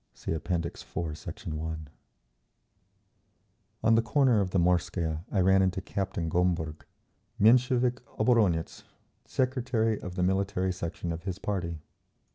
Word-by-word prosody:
(See -, -, -3 dB
App. 80 Hz, -, -6 dB
IV, 85 Hz, -2 st, -1 dB, 0.4 s
Sect. -, -, -9 dB
1) 80 Hz, -1 st, -4 dB, 2.0 s
On 115 Hz, -, +5 dB
the 115 Hz, -, +5 dB
corner 125 Hz, -2 st, +3 dB
of 95 Hz, -, -1 dB
the 95 Hz, -, 0 dB
Morskaya 85 Hz, -2 st, +1 dB
I 95 Hz, -, +2 dB
ran 95 Hz, +1 st, +5 dB
into 95 Hz, -1 st, +1 dB
Captain 95 Hz, -3 st, -3 dB
Gomberg, 80 Hz, -2 st, 0 dB, 0.5 s
Menshevik 125 Hz, +2 st, +4 dB, 0.2 s
oboronetz, 110 Hz, -8 st, +2 dB, 0.4 s
secretary 125 Hz, -4 st, 0 dB
of 90 Hz, 0 st, -6 dB
the 90 Hz, -, 0 dB
Military 95 Hz, 0 st, +1 dB
Section 85 Hz, -1 st, -4 dB
of 80 Hz, +2 st, -6 dB
his 95 Hz, -2 st, -3 dB
party. 90 Hz, -6 st, -3 dB
95 Hz, 125 wpm, -29 LUFS, 85-110 Hz, 2.0 s, On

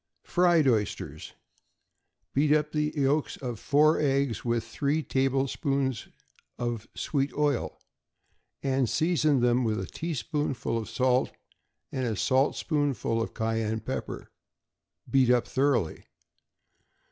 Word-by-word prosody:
=Fried 175 Hz, -4 st, +3 dB
Oysters.= 110 Hz, -5 st, -1 dB, 1.0 s
Beat 145 Hz, +2 st, +2 dB
up 150 Hz, 0 st, +1 dB
the 150 Hz, 0 st, 0 dB
yolks 145 Hz, +2 st, +1 dB
of 120 Hz, -5 st, -5 dB
four 150 Hz, +2 st, +3 dB
eggs 140 Hz, -5 st, +1 dB
with 115 Hz, -1 st, 0 dB
three 140 Hz, +7 st, -1 dB
tablespoonfuls 135 Hz, -2 st, 0 dB, 0.5 s
of 120 Hz, -2 st, -3 dB
sweet 140 Hz, -1 st, -1 dB
oil, 145 Hz, -4 st, 0 dB, 0.9 s
and 135 Hz, -3 st, +1 dB
season 155 Hz, -5 st, +2 dB
them 120 Hz, +1 st, +3 dB
with 110 Hz, -1 st, 0 dB
a -, -, -3 dB
teaspoonful 150 Hz, -5 st, -3 dB
of 110 Hz, -, -6 dB
salt 130 Hz, 0 st, +1 dB, 0.6 s
and 130 Hz, -2 st, -2 dB
a 110 Hz, -, -1 dB
saltspoonful 135 Hz, -, +1 dB
of 115 Hz, -, -4 dB
cayenne 110 Hz, -1 st, -1 dB
pepper; -, -, -5 dB, 0.8 s
beat 130 Hz, -2 st, +3 dB
up 125 Hz, -1 st, +3 dB
thoroughly. 130 Hz, -, 0 dB
135 Hz, 110 wpm, -28 LUFS, 120-145 Hz, 1.0 s, =Fried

